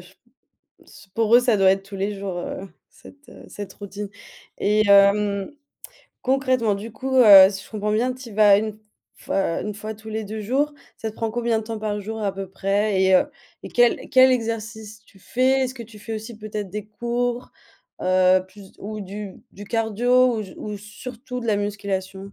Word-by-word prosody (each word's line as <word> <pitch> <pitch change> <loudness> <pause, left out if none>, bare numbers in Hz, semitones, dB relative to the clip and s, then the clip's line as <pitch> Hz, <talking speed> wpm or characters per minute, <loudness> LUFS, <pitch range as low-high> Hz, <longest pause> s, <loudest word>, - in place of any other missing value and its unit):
je 180 +1 -18
p 240 +6 -35 0.5
c - - -16
pour 225 0 +1
eux, - - +8
ça 245 -3 +2
doit 195 -1 +4
être 195 0 -1
tous 195 0 -10
les 200 +1 -3
jours, 190 -3 -4
heu, 195 +2 -6 0.2
cette, 285 +1 -17
heu, - - -14
cette 205 -2 -8
routine. 205 0 -7 0.5
Et 210 +1 +2
hem, 200 +1 +4 0.7
concrètement, 255 -5 +1
du 215 +3 -7
coup, 265 +4 -4
heu, 200 -6 +9
si 195 -1 -7
je - - -18
comprends 210 -1 -2
bien, 245 +4 +1
tu 255 -2 -11
y - - -11
vas 205 -1 +6
1 215 +1 -1 0.4
f - - -19
fois 190 -3 0
1 210 -1 -4
fois 215 +1 -6
tous 220 +1 -13
les 220 0 -3
2 215 +2 -6
jours, 280 +7 0 0.2
ça 225 - -4
te - - -17
prend 225 -1 -2
combien 235 -1 0
de - - -9
temps 225 -1 -5
par 210 -1 -3
jour 220 +2 -6
à 200 -2 -1
peu 195 -1 -6
près? 195 +1 0
Et 190 0 +4
heu 185 - +5 0.4
et - - -7
quel 240 -1 +2
quel 260 -1 +6
exercice 220 -2 -4
tu 195 - -22
fais? 260 +6 +1
Est-ce 260 0 -1
que 235 -3 -8
tu 215 -1 -15
fais 225 +2 -6
aussi 220 +1 -7
peut-être 210 -2 -5
des 210 +2 -6
cours? 240 +3 -3 0.5
Heu, 185 0 +4
plus 195 0 -15
ou 215 +1 -6
du 200 0 -7 0.2
du 205 - -10
cardio 240 +3 +2
ou 215 - -2
d 190 - -11
ou 210 -1 -6
surtout 245 +5 -8
de 235 - -6
la 215 - +2
musculation? 200 -1 -4
215 Hz, 210 wpm, -23 LUFS, 200-235 Hz, 0.7 s, heu